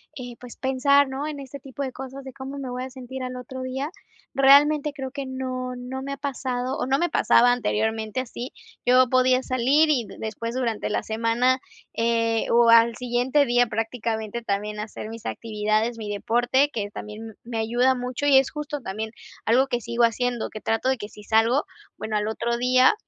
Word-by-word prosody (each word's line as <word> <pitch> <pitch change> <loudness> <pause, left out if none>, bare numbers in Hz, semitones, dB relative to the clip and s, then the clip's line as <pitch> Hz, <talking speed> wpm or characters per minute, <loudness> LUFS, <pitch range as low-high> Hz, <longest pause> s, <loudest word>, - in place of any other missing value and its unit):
eh, 245 -3 -8
pues, 245 -1 -11
pensar 275 +1 +3
no 270 +3 -3
en 295 -2 -5
este 275 +1 -9
tipo 275 +1 -6
de 265 - -3
cosas, 265 +1 -8
de 265 - -8
cómo 265 +2 -7
me 270 -2 -5
voy 250 +1 -4
a 260 - -6
sentir 260 0 -8
al 255 0 -4
otro 250 +1 -7
día. 265 +4 -3 0.4
Realmente 285 +2 +5
creo 265 -2 -6
que 280 0 -5
no, 255 -1 -4
no 255 +2 -6
me 275 +1 -4
ha - - -6
pasado 260 -1 -3
o - - -1
no 270 +2 +1
me 345 - +1
pasaba 245 +1 +5
anteriormente, 220 0 -1
así 245 0 -7 0.3
yo 250 0 +5
podía 255 0 +3
salir 265 +6 +3
y 255 -6 +2
después 230 +2 -4
durante 235 -4 -1
la - - -1
semana, 230 +4 +1 0.3
eh, 230 -1 +1
o 235 0 +5
al 230 0 +6
siguiente 250 +4 +1
día 245 -1 +3
prácticamente, 225 0 -3
también 210 -1 -2
hacer 215 0 -6
mis 225 0 -9
actividades, 215 +1 -1
mi 215 -2 -6
deporte, 245 +7 +2
que 205 -5 -3
también 215 +1 -8
me 235 -1 -5
ayuda 240 +4 +2
mucho 250 +2 -4
y 280 -2 +6
es 270 0 +3
justo 300 -1 -4
también 220 +1 -4 0.3
algo 255 +4 +4
que 245 -2 -1
sigo 235 +2 0
haciendo, 240 +1 -1
que 215 - -8
trato 225 +3 0
de 265 - +1
si 210 - -13
salgo, 225 +6 +3 0.3
bueno, 215 0 -4
al 210 0 0
otro 235 +2 -1
día, 255 - +5
250 Hz, 190 wpm, -24 LUFS, 230-265 Hz, 0.4 s, al